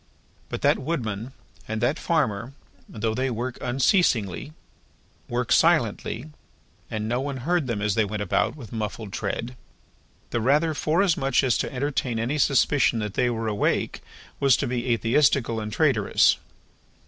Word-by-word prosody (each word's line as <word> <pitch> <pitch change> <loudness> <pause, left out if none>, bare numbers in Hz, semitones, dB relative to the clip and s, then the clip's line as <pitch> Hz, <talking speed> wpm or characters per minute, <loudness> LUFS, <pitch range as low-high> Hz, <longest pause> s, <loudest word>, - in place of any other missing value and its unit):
But - - -5
that - - +4
Woodman 125 -6 -3 0.4
and 110 0 -3
that 135 +7 +1
Farmer, 130 - 0 0.4
though 110 0 -2
they 130 +3 -1
work 120 +1 -4
unceasingly, 125 - +1 0.8
work 120 0 -2
silently, 120 - +2 0.6
and 110 0 -3
no 120 +3 0
one 140 -1 -3
heard 175 -4 +1
them 105 -4 -2
as 105 -2 +1
they 110 - +2
went 105 0 -3
about 100 0 0
with 120 -8 -11
muffled 105 -2 -5
tread: 125 +2 -3 0.8
the 120 - 0
rather, 150 +7 +3
forasmuch 155 -4 +2
as 130 -3 +2
to - - -2
entertain 130 -3 -1
any 125 +7 -1
suspicion 135 -2 +3
that 105 -2 -3
they 125 +2 +1
were 115 -1 -2
awake, 105 -1 0 0.4
was 135 -3 +4
to - - -1
be 120 0 -2
atheistical 115 0 +2
and 105 -1 -5
traitorous. 115 -5 +3
120 Hz, 150 wpm, -25 LUFS, 110-140 Hz, 0.8 s, that